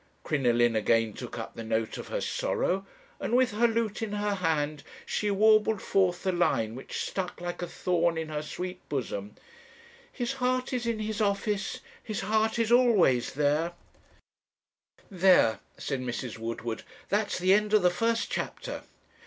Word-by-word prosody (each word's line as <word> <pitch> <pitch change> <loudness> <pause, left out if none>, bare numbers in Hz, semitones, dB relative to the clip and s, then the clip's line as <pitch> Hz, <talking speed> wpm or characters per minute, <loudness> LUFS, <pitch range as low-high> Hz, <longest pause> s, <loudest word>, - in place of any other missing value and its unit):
"Crinoline 120 -5 +2
again 110 0 +2
took - - -7
up - - -6
the 115 - -7
note 110 0 -1
of - - -7
her - - -2
sorrow, 195 +2 -1 0.3
and 235 - 0
with 255 -1 +4
her 225 +3 +3
lute 225 -2 -1
in 215 -2 -3
her 205 0 0
hand, 155 -5 0 0.2
she 210 - -1
warbled 215 +1 +4
forth 185 -3 +1
the 190 - +1
line 115 -11 +1
which 130 - -5
stuck 185 -2 -4
like 175 0 -5
a 175 - -2
thorn 170 -2 0
in 160 -1 -3
her 150 -1 -2
sweet 180 +4 -5
bosom: 105 -7 -3 0.8
His 245 -2 -2
heart 255 0 0
is 245 -2 -1
in 230 -1 0
his 215 0 -3
office 205 0 0 0.2
his 215 -3 -3
heart 220 +1 +1
IS 230 -1 +1
ALWAYS 215 - +4
there." 150 +4 +1 1.4
'There,' 180 - +5 0.2
said 135 -3 -3
Mrs. 120 -2 -4
Woodward, 115 0 -4 0.3
'that's 205 +1 +1
the 185 +1 +4
end 210 +1 +2
of 215 -3 +4
the 180 - +5
first 230 +5 0
chapter.' - - -4
185 Hz, 160 wpm, -28 LUFS, 145-215 Hz, 1.4 s, There